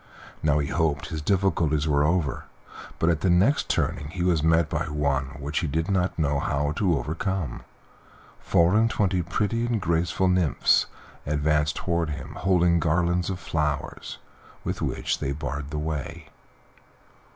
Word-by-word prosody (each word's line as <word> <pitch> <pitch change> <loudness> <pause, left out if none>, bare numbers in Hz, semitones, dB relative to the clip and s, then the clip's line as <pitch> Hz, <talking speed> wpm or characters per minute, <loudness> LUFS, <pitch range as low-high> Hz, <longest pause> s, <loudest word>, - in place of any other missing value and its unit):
Now 75 -1 +2
he 70 -1 -1
hoped 75 -4 0
his 75 - -4
difficulties 80 -4 +1
were 70 -1 +3
over, 80 -3 0 0.5
but 80 - +2
at 80 -3 -1
the 95 - +2
next 95 +11 +3
turning 75 - -1
he 85 +3 -4
was 85 -4 +2
met 80 0 +3
by 80 0 -2
one 70 -3 0
which 70 +2 -2
he 80 - -2
did 80 +6 -1
not 90 -1 0
know 75 -3 +1
how 70 +1 0
to 90 -6 +2
overcome. 85 +3 -3 0.8
Four 85 +2 +3
and 115 +1 +4
twenty 95 -4 +1
pretty 105 +7 -1
and 120 -2 0
graceful 85 +1 0
nymphs 90 -5 +3 0.4
advanced 75 +1 +1
toward 85 -2 -1
him, 75 0 -6
holding 90 -2 +2
garlands 85 +2 +1
of 95 -1 -3
flowers, 75 -5 -3 0.5
with - - -3
which - - -1
they 70 -1 -2
barred 70 -1 -5
the 75 - -4
way. 75 -2 -4
80 Hz, 155 wpm, -25 LUFS, 75-90 Hz, 0.8 s, and